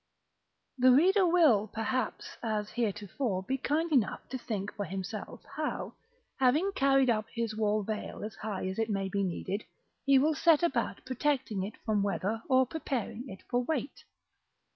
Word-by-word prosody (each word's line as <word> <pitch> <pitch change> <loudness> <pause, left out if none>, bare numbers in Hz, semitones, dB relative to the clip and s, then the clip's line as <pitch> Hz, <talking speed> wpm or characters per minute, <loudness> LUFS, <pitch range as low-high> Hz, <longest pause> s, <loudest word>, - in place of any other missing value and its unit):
§ - - -51 0.8
II. 255 - +8
The 250 - +7
reader 375 +4 +5
will, 305 - +5
perhaps, 230 +4 -3
as 215 -2 -2
heretofore, 210 -2 -2
be 265 +7 -2
kind 315 +5 0
enough 255 -9 +1
to 260 - -3
think 210 -4 -4
for 205 - -3
himself, 195 +3 -6
how, 305 -1 -3 0.5
having 295 +10 +3
carried 270 -3 +4
up 215 -1 -1
his 230 -2 -2
wall 215 -1 +1
veil 215 0 -5
as 215 - -5
high 205 -3 -4
as 190 +3 -4
it 225 0 0
may 195 -2 -1
be 200 +1 -1
needed, 190 +2 -3 0.4
he 275 -1 +5
will 300 +4 +4
set 320 +2 +4
about 345 - 0
protecting 255 -5 0
it 200 - -6
from 215 -2 +2
weather, 205 +2 -1
or 260 0 +5
preparing 255 -4 -4
it 190 - -10
for 245 0 +1
weight. 285 -1 -3
230 Hz, 170 wpm, -30 LUFS, 210-275 Hz, 0.8 s, II